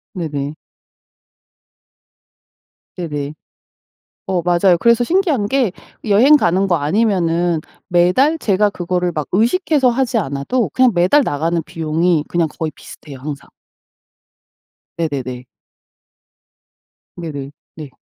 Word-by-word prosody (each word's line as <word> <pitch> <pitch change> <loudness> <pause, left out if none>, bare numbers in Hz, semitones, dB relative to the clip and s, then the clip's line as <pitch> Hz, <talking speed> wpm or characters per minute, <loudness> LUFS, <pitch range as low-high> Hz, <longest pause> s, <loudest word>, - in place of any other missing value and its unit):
네네. 145 -5 -4 2.4
네네. 150 -4 -4 1.0
어 185 -2 +1
맞아요. 175 +1 +3
그래서 235 +3 +3
신기한 325 - +1
게 255 -4 +1 0.3
여행 230 +8 +6
가는 190 - +2
거 180 - +2
아니면은 170 -1 +1 0.3
매달 180 - +3
제가 210 -6 +2
그거를 180 -2 -2
막 150 -2 -3
의식해서 265 - +2
하지 245 -1 0
않아도 170 - -1
그냥 255 -1 +4
매달 185 +11 +4
나가는 165 - -1
비용이 160 0 0
그냥 170 -2 0
거의 160 -2 -2
비슷해요, 140 -3 -12
항상. 145 +1 -7 1.5
네네네. 130 -6 -4 1.7
네네. 145 -5 -6 0.2
네. 155 -3 -8
175 Hz, 225 characters per minute, -18 LUFS, 155-225 Hz, 2.4 s, 여행